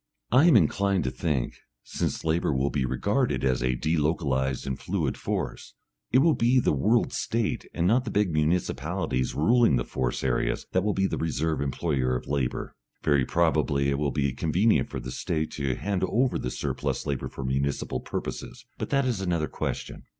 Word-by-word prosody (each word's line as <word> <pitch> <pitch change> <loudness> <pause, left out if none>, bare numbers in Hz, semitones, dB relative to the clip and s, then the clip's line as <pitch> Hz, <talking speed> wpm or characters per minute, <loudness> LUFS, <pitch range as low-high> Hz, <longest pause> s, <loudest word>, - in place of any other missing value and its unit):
I 130 +7 +6
am 160 - +7
inclined 100 +1 +2
to 65 - -1
think 65 -2 -1
that, - - -22 0.2
since - - -3
labour 80 0 +1
will 70 +2 +1
be 70 -3 0
regarded 65 - 0
as 65 -2 +1
a 65 0 +1
delocalised 75 -3 0
and 65 -1 -3
fluid 85 -8 -1
force, - - -4 0.4
it 130 +3 +5
will 165 -1 +5
be 125 +1 +3
the - - +2
World 110 - +2
State 115 -1 -1
and 85 - -1
not 120 +7 +3
the - - -3
big 100 -5 +1
municipalities 75 -5 0
ruling 115 - +4
the - - 0
force 60 -1 -2
areas - - 0
that 95 - +1
will 105 -1 0
be 95 - +2
the - - -1
reserve 80 -1 -1
employer 70 -2 0
of 60 - -4
labour. 70 -3 -2 0.3
Very 70 -4 +3
probably 75 -4 +2
it 70 - -1
will 75 -1 +1
be 70 0 0
convenient 80 - +2
for 65 - -4
the 60 0 -6
State 80 +4 -2
to 70 -4 -2
hand 95 +2 -2
over 125 +2 +1
the 60 - -3
surplus - - -3
labour 70 -3 -2
for 65 - -6
municipal 70 +2 -1
purposes, - - -6
but - - -3
that 140 -1 +2
is 120 -7 -1
another 85 -4 0
question. - - -5
75 Hz, 185 wpm, -27 LUFS, 65-95 Hz, 0.4 s, am